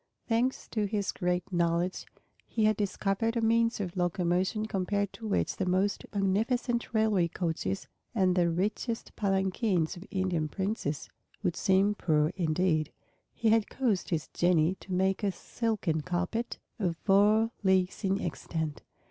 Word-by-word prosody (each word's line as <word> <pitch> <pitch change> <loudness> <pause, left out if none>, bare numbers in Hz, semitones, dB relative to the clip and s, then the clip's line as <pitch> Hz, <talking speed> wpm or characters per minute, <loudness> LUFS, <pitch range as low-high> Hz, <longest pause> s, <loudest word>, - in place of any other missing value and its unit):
Thanks 240 +3 0
to 215 -2 0
his 200 -1 -1
great 180 0 -2
knowledge, 170 +1 0 0.4
he 220 -2 +1
had 215 0 +4
discovered 205 +3 0
a - - +1
means 230 +1 +2
of 185 -3 -4
locomotion 180 +3 0
compared 200 0 -1
to 225 - -7
which 205 - 0
the 190 - 0
most 190 +3 +1
magnificent 230 +5 0
railway 215 -6 +3
coaches 160 - -2 0.3
and 185 -4 +3
the 175 -2 +3
richest 210 +7 -2
palanquins 190 -3 +1
of 175 - -9
Indian 185 -5 0
princes 190 -4 -3 0.4
would 180 -3 0
seem 195 +1 +3
poor 155 -5 +1
indeed. 160 -3 +1 0.4
He 225 - +1
had 220 -1 +3
caused 230 -8 0
his 160 -3 -1
Genii 175 -1 +3
to 190 - -11
make 190 +1 +1
a 200 -2 +1
silken 190 -4 -2
carpet 180 +8 -2 0.2
of 175 -5 0
four 210 +4 +4
leagues 190 +1 +2
in 195 0 +1
extent. 160 -2 -3
190 Hz, 145 wpm, -30 LUFS, 175-215 Hz, 0.4 s, had